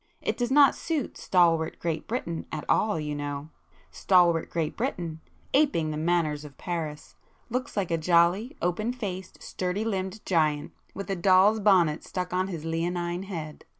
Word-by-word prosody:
It -, -, -1 dB
does 245 Hz, -1 st, -1 dB
not 280 Hz, 0 st, +6 dB
suit 310 Hz, -7 st, -3 dB
stalwart 165 Hz, -3 st, +2 dB
Great 165 Hz, -2 st, -3 dB
Britain 170 Hz, -9 st, -3 dB
at 155 Hz, -2 st, -4 dB
all, 210 Hz, -6 st, +2 dB
you 150 Hz, -1 st, -3 dB
know,—stalwart 160 Hz, +4 st, 0 dB
Great 160 Hz, -2 st, -2 dB
Britain, 170 Hz, -, -3 dB, 0.3 s
aping 265 Hz, -, +2 dB
the -, -, -3 dB
manners 155 Hz, -2 st, 0 dB
of 145 Hz, -3 st, -12 dB
Paris, 160 Hz, -4 st, -5 dB, 0.4 s
looks 250 Hz, -1 st, -3 dB
like 190 Hz, -4 st, 0 dB
a 165 Hz, -, +1 dB
jolly 175 Hz, -, +2 dB
open 215 Hz, +7 st, 0 dB
faced, 190 Hz, -7 st, -6 dB
sturdy 185 Hz, +4 st, -2 dB
limbed 195 Hz, -1 st, -3 dB
Giant, 155 Hz, -4 st, +1 dB, 0.2 s
with 195 Hz, +1 st, -5 dB
a -, -, 0 dB
doll's 190 Hz, +4 st, +5 dB
bonnet 180 Hz, -7 st, +3 dB
stuck 180 Hz, -1 st, -4 dB
on 185 Hz, +1 st, +1 dB
his 165 Hz, -5 st, -6 dB
leonine 175 Hz, +2 st, -2 dB
head. 160 Hz, -6 st, -6 dB
175 Hz, 155 wpm, -27 LUFS, 160-195 Hz, 0.4 s, not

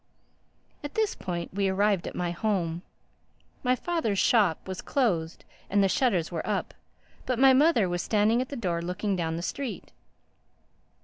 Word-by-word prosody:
At 290 Hz, -, -7 dB
this 435 Hz, -2 st, +1 dB
point 175 Hz, -2 st, -5 dB
we 195 Hz, 0 st, +1 dB
arrived 195 Hz, -1 st, +1 dB
at -, -, -6 dB
my 175 Hz, -1 st, -1 dB
home. 175 Hz, -3 st, -1 dB, 0.8 s
My 250 Hz, 0 st, +2 dB
father's 255 Hz, -, -1 dB
shop 195 Hz, -7 st, +2 dB
was 185 Hz, -1 st, -5 dB
closed 175 Hz, -12 st, -1 dB, 0.2 s
and 200 Hz, 0 st, +3 dB
the -, -, +4 dB
shutters 190 Hz, -6 st, +1 dB
were -, -, -2 dB
up; -, -, -2 dB, 0.5 s
but 255 Hz, -, 0 dB
my 265 Hz, +1 st, +6 dB
mother 265 Hz, -, +4 dB
was 175 Hz, 0 st, -2 dB
standing 220 Hz, +3 st, +2 dB
at 255 Hz, -, -4 dB
the 285 Hz, -, -5 dB
door 180 Hz, -8 st, -2 dB
looking 185 Hz, +4 st, -2 dB
down 165 Hz, -2 st, -2 dB
the 170 Hz, -, -4 dB
street. 270 Hz, +5 st, -5 dB
200 Hz, 165 wpm, -27 LUFS, 175-250 Hz, 0.8 s, my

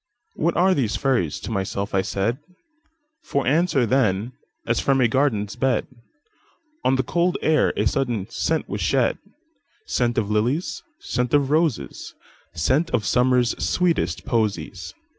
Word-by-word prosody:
"What 165 Hz, +2 st, 0 dB
are 185 Hz, +2 st, +4 dB
these 125 Hz, -, 0 dB
fairies?" 125 Hz, -, 0 dB
to -, -, -6 dB
myself 100 Hz, -1 st, -3 dB
I 95 Hz, -, +3 dB
said; 100 Hz, +7 st, -1 dB, 0.8 s
For 140 Hz, -, -2 dB
answer, 145 Hz, -2 st, +2 dB
then, 115 Hz, -2 st, +1 dB, 0.3 s
as -, -, +1 dB
from 135 Hz, -1 st, +2 dB
a 125 Hz, -, +4 dB
garden's 110 Hz, -6 st, 0 dB
bed, 130 Hz, -1 st, +1 dB, 1.0 s
On 130 Hz, -, +3 dB
the 130 Hz, -, +1 dB
cold 175 Hz, +7 st, 0 dB
air 155 Hz, 0 st, +3 dB
a -, -, +1 dB
sudden 120 Hz, -8 st, -1 dB
scent -, -, -1 dB
was -, -, -4 dB
shed,—Scent 120 Hz, -1 st, -2 dB
of 105 Hz, -2 st, 0 dB
lilies, 120 Hz, +11 st, 0 dB, 0.2 s
scent 125 Hz, +1 st, -1 dB
of 140 Hz, -1 st, +2 dB
roses, 150 Hz, -, -1 dB, 0.4 s
Scent 150 Hz, -, +1 dB
of 110 Hz, -8 st, 0 dB
Summer's 125 Hz, 0 st, +3 dB
sweetest 180 Hz, -2 st, 0 dB
posies. 100 Hz, -6 st, -2 dB
125 Hz, 140 wpm, -23 LUFS, 105-145 Hz, 1.0 s, are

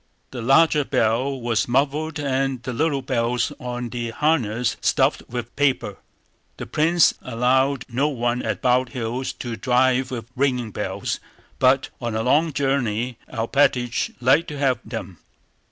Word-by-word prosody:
The 125 Hz, -, -6 dB
larger 145 Hz, +5 st, +4 dB
bell 130 Hz, +3 st, 0 dB
was 115 Hz, -4 st, 0 dB
muffled 145 Hz, +5 st, 0 dB
and 135 Hz, -3 st, -1 dB
the 125 Hz, +2 st, -4 dB
little 140 Hz, +1 st, 0 dB
bells 120 Hz, -2 st, 0 dB
on 125 Hz, -1 st, -4 dB
the 120 Hz, -1 st, -4 dB
harness 120 Hz, -4 st, 0 dB
stuffed -, -, +2 dB
with 120 Hz, -1 st, -5 dB
paper. 135 Hz, -8 st, 0 dB, 0.6 s
The -, -, -6 dB
prince 165 Hz, +2 st, +3 dB
allowed 130 Hz, +2 st, +1 dB
no 130 Hz, +5 st, 0 dB
one 120 Hz, -3 st, -1 dB
at -, -, -3 dB
Bald 125 Hz, 0 st, +3 dB
Hills 125 Hz, +3 st, -2 dB
to 120 Hz, -2 st, -5 dB
drive 130 Hz, +1 st, +2 dB
with 120 Hz, -4 st, -5 dB
ringing 125 Hz, -4 st, 0 dB
bells; -, -, -3 dB, 0.4 s
but 130 Hz, +1 st, +3 dB
on 120 Hz, -2 st, -3 dB
a 110 Hz, -, 0 dB
long 155 Hz, +6 st, +3 dB
journey 125 Hz, -4 st, -1 dB
Alpátych 120 Hz, 0 st, +1 dB
liked 135 Hz, +7 st, +3 dB
to 150 Hz, -, -6 dB
have 135 Hz, -3 st, +1 dB
them. 100 Hz, -7 st, -7 dB
125 Hz, 145 wpm, -23 LUFS, 120-140 Hz, 0.6 s, larger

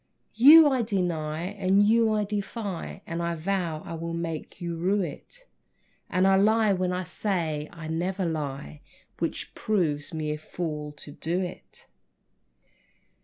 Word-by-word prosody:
You 300 Hz, +6 st, +9 dB
I 265 Hz, -3 st, +2 dB
deny 170 Hz, -7 st, -1 dB
and 195 Hz, +1 st, +2 dB
you 225 Hz, +1 st, +4 dB
I 215 Hz, -1 st, +1 dB
defy 205 Hz, -2 st, -4 dB
And 165 Hz, 0 st, -4 dB
I 170 Hz, 0 st, -1 dB
vow 170 Hz, -2 st, -2 dB
I -, -, -6 dB
will 165 Hz, +1 st, -4 dB
make 165 Hz, -1 st, -5 dB
you 170 Hz, -2 st, -3 dB
rue 190 Hz, +5 st, +1 dB
it; -, -, -9 dB, 0.6 s
And 185 Hz, +1 st, +2 dB
I 195 Hz, 0 st, +5 dB
lie 215 Hz, +1 st, +4 dB
when 185 Hz, -1 st, 0 dB
I 180 Hz, +1 st, -2 dB
say 160 Hz, -5 st, -2 dB
that -, -, -17 dB
I 160 Hz, -1 st, -7 dB
never 180 Hz, +4 st, -1 dB
lie, 140 Hz, -, -4 dB, 0.4 s
Which -, -, -3 dB
proves 160 Hz, -9 st, 0 dB
me 155 Hz, -2 st, -2 dB
a 150 Hz, -, -4 dB
fool 150 Hz, -2 st, -5 dB
to 150 Hz, 0 st, -10 dB
do 170 Hz, +5 st, -2 dB
it! 180 Hz, -, -9 dB
175 Hz, 155 wpm, -27 LUFS, 160-200 Hz, 0.6 s, You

